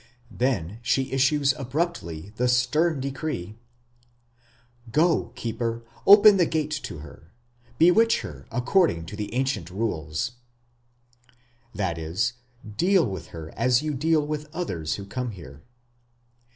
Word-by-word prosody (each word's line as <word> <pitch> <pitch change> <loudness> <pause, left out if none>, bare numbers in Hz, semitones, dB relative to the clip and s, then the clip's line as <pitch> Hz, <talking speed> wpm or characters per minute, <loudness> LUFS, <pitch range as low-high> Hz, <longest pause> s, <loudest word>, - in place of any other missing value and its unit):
Then 110 -3 -1
she 130 +2 0
issues 135 +1 +3
abruptly 125 - -3
the 125 - +2
stern 140 +6 +2
decree: 130 - -4 1.3
Go, 165 +6 +3
keeper, 115 0 -3 0.2
open 205 0 +9
the 175 -3 +3
gate 155 -2 -1
to - - -7
her, 80 +2 -14 0.5
Bewitch 205 - +5
her 65 -3 -9
according 125 - +2
to 90 - -8
the 105 -1 -5
ancient 125 - -1
rules; 90 -2 -2 1.4
that 85 -5 -2
is, 85 +10 -1 0.4
"Deal 185 -1 +4
with 95 -7 -5
her 80 -1 -9
as 125 +3 +2
you 155 -1 -1
deal 155 +2 +2
with 150 0 -4
others 80 - -2
who 100 - -7
come 125 +5 -4
here". 70 -6 -12
125 Hz, 125 wpm, -25 LUFS, 95-155 Hz, 1.4 s, open